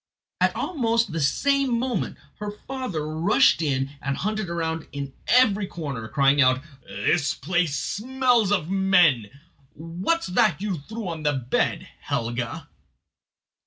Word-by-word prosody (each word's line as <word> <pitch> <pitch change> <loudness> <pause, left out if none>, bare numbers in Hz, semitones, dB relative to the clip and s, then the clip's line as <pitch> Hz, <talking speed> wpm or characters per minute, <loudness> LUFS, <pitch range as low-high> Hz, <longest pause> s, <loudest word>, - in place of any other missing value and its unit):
Almost 230 - 0
at - - -8
the 165 - -1
same 275 - +2
moment 245 -3 -2 0.2
her 210 0 -4
father 210 - -5
rushed 170 - +3
in 135 -3 0
and 135 0 -2
hunted 215 0 -2
round 165 -1 -3
in 140 -1 -6
every 210 -6 +4
corner, 140 -11 -5
crying 140 +3 +3
out: 130 0 +3 0.2
"This 140 - 0
place 165 -1 0
smells 245 -2 +1
of 185 -6 +1
men. 180 - +3 0.5
What's 175 - -2
that 190 -3 +2
you 195 -5 -2
threw 220 +7 -7
on 165 -2 -4
the 150 -1 +1
bed, 130 -2 -1
Helga?" 120 0 -3
175 Hz, 130 wpm, -24 LUFS, 140-215 Hz, 0.5 s, every